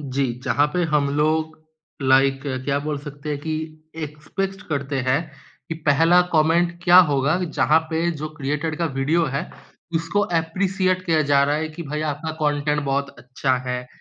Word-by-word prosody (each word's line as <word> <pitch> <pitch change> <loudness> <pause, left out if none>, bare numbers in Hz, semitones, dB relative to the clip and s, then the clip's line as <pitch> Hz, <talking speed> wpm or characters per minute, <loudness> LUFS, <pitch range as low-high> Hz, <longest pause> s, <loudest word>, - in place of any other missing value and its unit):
जी, 135 -2 -1
जहाँ 145 +1 +3
पे 180 - +1
हम 145 -2 +3
लोग 155 +1 0 0.4
लाइक, 135 +1 +3 0.2
क्या 140 0 +1
बोल 150 0 -3
सकते 145 +1 -9
हैं, 145 - -2
कि 155 +1 -6
एक्सपेक्ट 170 +6 -5
करते 140 -2 -2
हैं 135 +4 +3 0.5
कि 160 - -3
पहला 165 +5 +5
कॉमेंट 165 +2 +3
क्या 175 0 +7
होगा 140 +4 +2
जहाँ 160 -1 +3
पे 165 +2 +1
जो 155 - -3
क्रिएटर 150 +2 -2
का 170 - -1
वीडियो 150 +6 +2
है 140 - -3 0.5
उसको 165 +5 0
एप्रिशिएट 185 +2 0
किया 160 -2 +3
जा 140 -1 +5
रहा 145 +1 +1
है 155 +1 -2
कि 155 +2 -8
भाई 150 0 -4
आपका 155 +3 -4
कॉन्टेंट 150 -1 0
बहुत 140 0 -1
अच्छा 130 +1 -1
है, 125 0 -3
150 Hz, 165 wpm, -22 LUFS, 140-165 Hz, 0.5 s, क्या